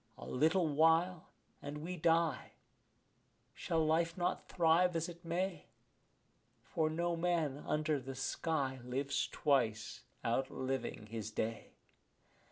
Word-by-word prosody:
A -, -, -9 dB
little 160 Hz, +6 st, +2 dB
while 165 Hz, +3 st, +3 dB, 0.3 s
and 145 Hz, +1 st, -5 dB
we 180 Hz, +2 st, -4 dB
die; 165 Hz, -1 st, +1 dB, 1.0 s
shall 160 Hz, -1 st, 0 dB
life 165 Hz, +2 st, +1 dB
not 175 Hz, 0 st, -1 dB
thrive 170 Hz, +1 st, +3 dB
as 165 Hz, 0 st, 0 dB
it 170 Hz, 0 st, -10 dB
may? 175 Hz, 0 st, -2 dB, 1.0 s
For 155 Hz, -1 st, 0 dB
no 170 Hz, +2 st, 0 dB
man 165 Hz, -5 st, 0 dB
under 150 Hz, -1 st, +1 dB
the 135 Hz, +1 st, -7 dB
sky 135 Hz, 0 st, -1 dB
lives 135 Hz, +3 st, -1 dB
twice, 120 Hz, -5 st, +1 dB, 0.2 s
outliving 130 Hz, -1 st, -2 dB
his 110 Hz, -1 st, -5 dB
day. 110 Hz, +1 st, -3 dB
155 Hz, 115 wpm, -35 LUFS, 135-170 Hz, 1.0 s, while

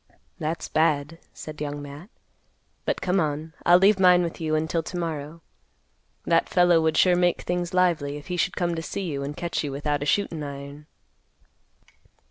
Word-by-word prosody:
"That's 160 Hz, +2 st, -3 dB
bad," 155 Hz, 0 st, +1 dB
said 155 Hz, -1 st, -9 dB
Young 145 Hz, -1 st, -3 dB
Matt. 145 Hz, +6 st, -10 dB, 0.8 s
"But -, -, -1 dB
come 185 Hz, +1 st, +1 dB
on, 155 Hz, 0 st, -2 dB
I'll 175 Hz, +1 st, +8 dB
leave 195 Hz, +2 st, +4 dB
mine 180 Hz, -1 st, +6 dB
with 170 Hz, 0 st, -5 dB
you 155 Hz, -1 st, 0 dB
until 160 Hz, +2 st, 0 dB
to 175 Hz, -, -6 dB
morrow. 165 Hz, -1 st, -5 dB, 0.8 s
That 165 Hz, -1 st, +2 dB
fellow 175 Hz, -2 st, +4 dB
would 160 Hz, 0 st, +1 dB
sure 180 Hz, -1 st, +5 dB
make 175 Hz, 0 st, +2 dB
things 175 Hz, -1 st, -2 dB
lively, 165 Hz, -6 st, +1 dB
if 145 Hz, -, -11 dB
he 180 Hz, -, -3 dB
should 175 Hz, -, 0 dB
come 175 Hz, -1 st, 0 dB
to 165 Hz, -, -3 dB
see 195 Hz, +4 st, -4 dB
you, 145 Hz, -6 st, -3 dB
and 145 Hz, +2 st, -5 dB
catch 170 Hz, -2 st, -2 dB
you 145 Hz, -, -3 dB
without 145 Hz, +1 st, -2 dB
a 145 Hz, -, -2 dB
shootin' 170 Hz, -3 st, 0 dB
iron." 140 Hz, +1 st, -8 dB
160 Hz, 180 wpm, -25 LUFS, 145-175 Hz, 0.8 s, I'll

